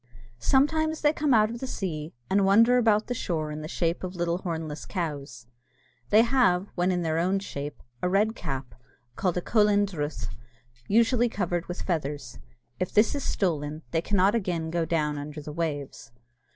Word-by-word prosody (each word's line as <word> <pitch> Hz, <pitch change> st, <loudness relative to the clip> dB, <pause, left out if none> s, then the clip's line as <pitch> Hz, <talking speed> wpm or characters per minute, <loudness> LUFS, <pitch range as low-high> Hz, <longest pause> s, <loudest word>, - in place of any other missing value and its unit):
Sometimes 315 Hz, -, +2 dB
they 295 Hz, 0 st, +4 dB
come 300 Hz, -2 st, 0 dB
out 215 Hz, -2 st, +5 dB
of 235 Hz, -, -6 dB
the 265 Hz, -, -4 dB
sea, 160 Hz, -9 st, -4 dB, 0.2 s
and 195 Hz, +1 st, +3 dB
wander 230 Hz, +6 st, +5 dB
about 215 Hz, -2 st, +3 dB
the 245 Hz, -, -2 dB
shore 160 Hz, -9 st, -2 dB
in 150 Hz, +1 st, -5 dB
the 155 Hz, -, -5 dB
shape 170 Hz, +1 st, -1 dB
of 185 Hz, 0 st, -5 dB
little 175 Hz, 0 st, -1 dB
hornless 160 Hz, -4 st, -5 dB
cows. 145 Hz, -, -4 dB, 0.6 s
They 215 Hz, +2 st, +6 dB
have, 230 Hz, -7 st, +2 dB
when 180 Hz, +1 st, +1 dB
in 175 Hz, -1 st, 0 dB
their 160 Hz, 0 st, 0 dB
own 185 Hz, +3 st, +2 dB
shape, 145 Hz, -7 st, -6 dB, 0.2 s
a 180 Hz, -, +1 dB
red 210 Hz, +4 st, +2 dB
cap, 135 Hz, -, -5 dB, 0.4 s
called 180 Hz, -2 st, 0 dB
a -, -, 0 dB
cohullen 210 Hz, -2 st, +3 dB
druith, 155 Hz, -6 st, -4 dB, 0.6 s
usually 235 Hz, +2 st, +3 dB
covered 175 Hz, -5 st, -2 dB
with 175 Hz, -, -5 dB
feathers. 145 Hz, -7 st, -3 dB, 0.4 s
If 185 Hz, -, -1 dB
this 210 Hz, +2 st, +4 dB
is 285 Hz, -2 st, -3 dB
stolen, 155 Hz, -4 st, -1 dB
they 165 Hz, -, +1 dB
cannot 195 Hz, +2 st, +3 dB
again 175 Hz, -7 st, -1 dB
go 170 Hz, -1 st, 0 dB
down 150 Hz, -3 st, 0 dB
under 150 Hz, +1 st, -7 dB
the 150 Hz, 0 st, -7 dB
waves. 145 Hz, -7 st, -4 dB
180 Hz, 180 wpm, -27 LUFS, 155-215 Hz, 0.6 s, They